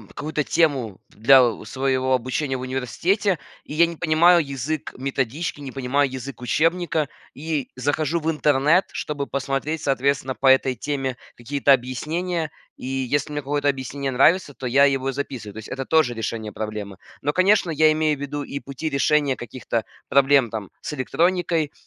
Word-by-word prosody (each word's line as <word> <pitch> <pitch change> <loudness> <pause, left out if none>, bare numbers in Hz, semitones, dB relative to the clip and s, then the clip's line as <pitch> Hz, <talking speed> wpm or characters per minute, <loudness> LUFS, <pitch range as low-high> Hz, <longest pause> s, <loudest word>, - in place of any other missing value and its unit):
какую-то 150 0 -2
тему 135 - +1
для, 130 +5 +6
э, 115 -3 0
своего 130 +1 0
обучения 130 +2 -2
в - - -7
университете, 160 - 0 0.3
и - - -9
я 170 +2 +6
не 170 0 -5
понимаю 170 +1 +4
язык 140 +2 -4
методички, 135 +3 -2
не 135 -2 -6
понимаю 135 +1 0
язык 130 0 -7
учебника 165 +4 +1 0.3
и 150 -1 -3
захожу 145 +5 0
в 160 +1 0
интернет, 150 +3 +3
чтобы 145 -2 -4
посмотреть, 140 +3 -2
соответственно, 135 -1 0
по 135 - -1
этой 130 -1 +5
теме 135 0 -3 0.2
какие-то 140 +3 +2
объяснения, 155 +7 -2 0.3
и - - -10
если 135 +2 -1
мне 145 - -2
какое-то 145 +1 -1
объяснение 135 +1 -3
нравится, 145 +4 +3
то 130 - -7
я 135 +3 +5
его 135 -1 +1
записываю. 130 -6 -5
То - - -12
есть 110 - -8
это 135 +1 -4
тоже 155 -7 +2
решение 110 -1 -4
проблемы, 105 -2 -5 0.2
но, 145 +1 0
конечно, 185 -1 +3
я 155 0 +4
имею 155 -1 +1
в - - -12
виду 145 +1 -4
и 140 - -5
пути 140 +3 -5
решения 140 -1 +2
каких-то 120 -2 -4 0.2
проблем, 140 0 +5
там, 105 -4 -6
с - - -5
электроникой, 165 +2 0
140 Hz, 165 wpm, -23 LUFS, 130-155 Hz, 0.3 s, для